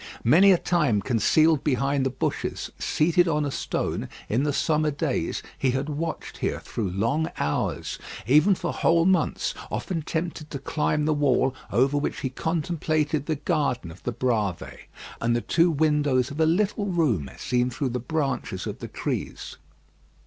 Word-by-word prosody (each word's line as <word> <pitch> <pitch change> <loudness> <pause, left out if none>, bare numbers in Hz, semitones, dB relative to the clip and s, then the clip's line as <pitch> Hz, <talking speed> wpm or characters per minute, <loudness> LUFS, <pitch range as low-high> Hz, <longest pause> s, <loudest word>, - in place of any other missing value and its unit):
Many 180 +11 +6
a 185 - +5
time 155 -12 +1
concealed 135 +8 +3
behind 135 0 +1
the - - 0
bushes, 130 0 -3
seated 175 +3 +2
on 150 -2 +1
a 140 - -2
stone, - - -2 0.2
in 115 +5 +1
the 145 +1 +1
summer 155 +1 +1
days, 145 - -2 0.2
he 135 - +2
had 135 +4 -1
watched 160 +2 -4
here - - -1
through 105 -5 -4
long 115 - 0
hours, 75 - -2 0.3
even 155 - +5
for 175 -1 -3
whole 165 0 +3
months, 190 0 +1 0.2
often 170 -4 -3
tempted 160 0 -4
to 140 - -4
climb 150 +2 0
the 155 - +2
wall, 135 -3 +2 0.2
over 135 +4 +3
which 145 - -3
he 130 - -2
contemplated 155 -1 -1
the 160 - +1
garden 140 - -1
of 80 - -14
the 120 - -2
Bravées 110 -7 -2 0.3
and 120 +1 +2
the 120 - 0
two 170 +6 +3
windows 145 -5 +2
of 145 - -7
a 160 - +4
little 200 +4 +1
room 140 - +1
seen 125 0 0
through 130 +2 -2
the 125 +1 -2
branches 130 - -2
of - - -5
the - - -6
trees. - - -4
145 Hz, 165 wpm, -25 LUFS, 125-160 Hz, 0.3 s, Many